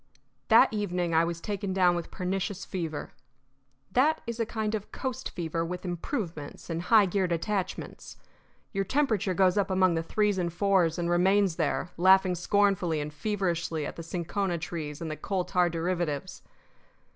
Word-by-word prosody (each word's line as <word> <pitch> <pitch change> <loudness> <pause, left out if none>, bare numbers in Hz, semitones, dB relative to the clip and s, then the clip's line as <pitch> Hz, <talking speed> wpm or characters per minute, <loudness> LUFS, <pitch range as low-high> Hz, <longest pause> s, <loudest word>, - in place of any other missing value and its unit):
That - - +6
evening 180 -5 -1
I 160 +1 +5
was 170 0 -2
taken 200 0 -3
down 180 -2 +4
with 170 -1 -4
pernicious 190 +1 -3
fever. 165 -5 -4 0.8
That 290 +9 +3
is 235 0 -5
a 230 - 0
kind 220 -1 -2
of 210 -2 -4
coast 260 0 -4
fever 165 -1 -3
with 180 +3 -5
improvements 175 - -5
and 165 0 -2
high 210 +3 +5
geared 185 -1 0
attachments. 185 +3 -3 0.6
Your 195 -1 0
temperature 220 -6 +1
goes 190 +1 +3
up 200 - 0
among 185 -1 +3
the 165 - 0
threes 205 +3 +1
and 170 -1 -1
fours 180 -2 +2
and 170 -1 -1
remains 185 +1 +3
there, 155 +1 -1
laughing 185 +1 +5
scornfully 180 -2 +1
and 150 0 -4
feverishly 170 -3 -1
at - - -6
the - - -7
cinchona 175 +2 -2
trees 160 -2 -5
and 160 -1 -3
the - - -3
coal 185 +2 -2
tar 180 -1 +2
derivatives. 175 0 -2
180 Hz, 165 wpm, -28 LUFS, 170-200 Hz, 0.8 s, That